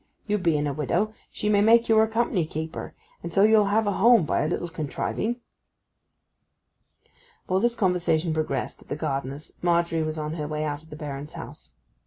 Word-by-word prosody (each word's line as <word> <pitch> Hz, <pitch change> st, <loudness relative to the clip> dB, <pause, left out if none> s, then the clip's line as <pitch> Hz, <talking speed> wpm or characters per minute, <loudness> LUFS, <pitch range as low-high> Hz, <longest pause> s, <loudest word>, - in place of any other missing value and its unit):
You 210 Hz, -1 st, 0 dB
being 160 Hz, -5 st, +1 dB
a 145 Hz, -, -1 dB
widow, 175 Hz, +9 st, 0 dB, 0.2 s
she 210 Hz, -, -4 dB
may 205 Hz, -1 st, +4 dB
make 230 Hz, +2 st, +5 dB
you 225 Hz, -, +4 dB
her 220 Hz, 0 st, +5 dB
company 220 Hz, -5 st, 0 dB
keeper; 160 Hz, +1 st, -6 dB, 0.3 s
and 170 Hz, -, -6 dB
so 195 Hz, +4 st, +4 dB
you'll 215 Hz, -1 st, +5 dB
have 215 Hz, +2 st, +2 dB
a 205 Hz, -, +1 dB
home 225 Hz, -2 st, +5 dB
by -, -, 0 dB
a 150 Hz, -, 0 dB
little 175 Hz, +1 st, -2 dB
contriving.' 190 Hz, -, -3 dB, 2.0 s
While 185 Hz, +1 st, +1 dB
this 235 Hz, +3 st, +1 dB
conversation 175 Hz, -5 st, +1 dB
progressed 155 Hz, 0 st, -2 dB
at -, -, -18 dB
the -, -, -3 dB
gardener's 140 Hz, -1 st, -4 dB
Margery 170 Hz, -1 st, +1 dB
was 155 Hz, 0 st, -2 dB
on 155 Hz, 0 st, -3 dB
her 150 Hz, -3 st, -4 dB
way 150 Hz, 0 st, -3 dB
out 145 Hz, -1 st, -3 dB
of 160 Hz, -, -19 dB
the 150 Hz, -, -8 dB
Baron's 145 Hz, -1 st, -6 dB
house. -, -, -10 dB
170 Hz, 190 wpm, -25 LUFS, 155-210 Hz, 2.0 s, make